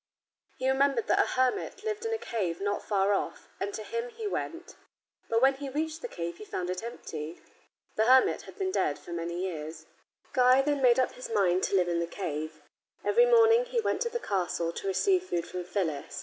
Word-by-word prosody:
He 260 - -1
remembered 275 +10 +2
that - - +4
a - - +1
hermit 260 - 0
lived 435 0 -3
in - - -2
a 450 - +1
cave 190 - -2
not 205 +1 -1
far 200 -1 +2
off, - - -3
and 200 +1 -2
to 215 - -5
him 465 - -3
he 455 -2 -7
went. 350 -4 -4 0.5
But 230 +2 +2
when 270 +1 +6
he 275 +1 -6
reached 310 +3 -3
the 485 - -4
cave 170 - -5
he - - -9
found 180 -3 -3
it 185 - -3
empty. 165 -8 -6 0.6
The 220 - +3
hermit 255 +2 +5
had - - -13
been 380 -2 -1
dead 145 - 0
many 170 +1 -3
years. 160 -4 -5 0.5
Guy 255 +1 +5
then 290 -1 0
made 250 -1 +5
up 255 - +2
his 250 - -8
mind 190 -5 +2
to - - 0
live 180 -2 +3
in 170 -1 0
the 170 - -1
cave. 155 -4 -5 0.4
Every 480 +3 +5
morning 460 0 +6
he - - -1
went - - 0
to 475 - +1
the 475 - -3
castle 175 - -1
to 195 - -6
receive 365 - +2
food 170 -1 -1
from 180 0 -5
Phyllis. 165 -7 -3
230 Hz, 210 wpm, -29 LUFS, -, 0.6 s, when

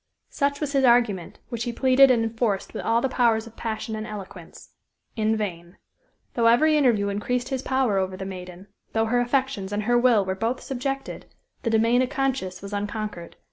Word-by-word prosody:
Such 285 0 0
was 295 -2 -2
his 275 -1 +2
argument, 235 -8 +2
which 235 -2 -3
he 240 - -2
pleaded 260 +2 +5
and 235 -3 +3
enforced 225 -3 -1
with - - -4
all 230 +1 +2
the 270 - +1
powers 235 -3 +2
of 230 -1 -13
passion 220 -1 -4
and 215 0 -5
eloquence. 205 -3 -10 0.5
In 220 -1 +1
vain. 175 -4 -5 0.6
Though 230 -1 +2
every 305 +7 +5
interview 235 -9 +3
increased 245 +5 -2
his 265 -2 -2
power 260 -7 +1
over 190 0 -2
the 190 - -6
maiden 180 -1 -8 0.3
though 225 0 +2
her 245 +2 +1
affections 245 -5 -1
and 205 +1 -1
her 240 +2 +3
will 240 -5 +4
were 190 - -1
both 225 +6 -2
subjected, 270 +1 -4 0.3
the 230 - -1
domain 230 +2 +3
of 255 - 0
conscience 265 -10 -2
was 200 +1 -7
unconquered. 205 -3 -4
230 Hz, 190 wpm, -24 LUFS, 205-255 Hz, 0.6 s, pleaded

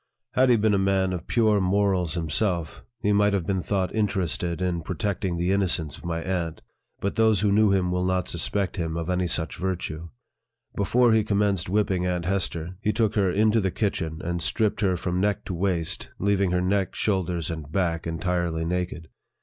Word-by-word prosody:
Had 130 0 +3
he 120 - +6
been 110 -1 +2
a 100 - +3
man 95 -1 +1
of 90 -2 -6
pure 110 -4 +3
morals 95 -2 +1
himself, 85 +1 -1 0.2
he 105 - +3
might 105 0 +3
have 95 -4 0
been 95 0 0
thought 95 0 -1
interested 90 -5 -1
in 90 -2 -1
protecting 95 0 -2
the 90 +2 0
innocence 90 -6 +1
of - - -14
rny 85 -1 -3
aunt; 85 -4 -3 0.4
but 100 - -2
those 110 -4 +4
who 105 -1 +2
knew 105 +1 +4
him 90 -2 +1
will 90 0 0
not 95 0 0
suspect 95 +3 -1
him 80 -2 -2
of 85 +2 -2
any 90 0 0
such 80 -1 -1
virtue. 85 -3 -3 0.7
Before 120 +3 +3
he 110 -1 +4
commenced 100 -3 0
whipping 95 -3 +1
Aunt 90 -1 -1
Hester, 90 -2 -1
he 105 -1 +1
took 110 0 +1
her 100 -3 +2
into 110 +4 +3
the 95 - +1
kitchen, 80 -6 -2
and 85 0 -2
stripped 110 +4 0
her 95 -3 +2
from 90 +1 -2
neck 100 -1 0
to - - -4
waist, 90 -2 -1
leaving 100 -1 +1
her 90 0 +1
neck, 95 +1 0
shoulders, 90 -5 -1
and 80 -3 -7
back, 85 -3 -1
entirely 85 0 -1
naked. 85 -1 -3
95 Hz, 190 wpm, -25 LUFS, 85-100 Hz, 0.7 s, he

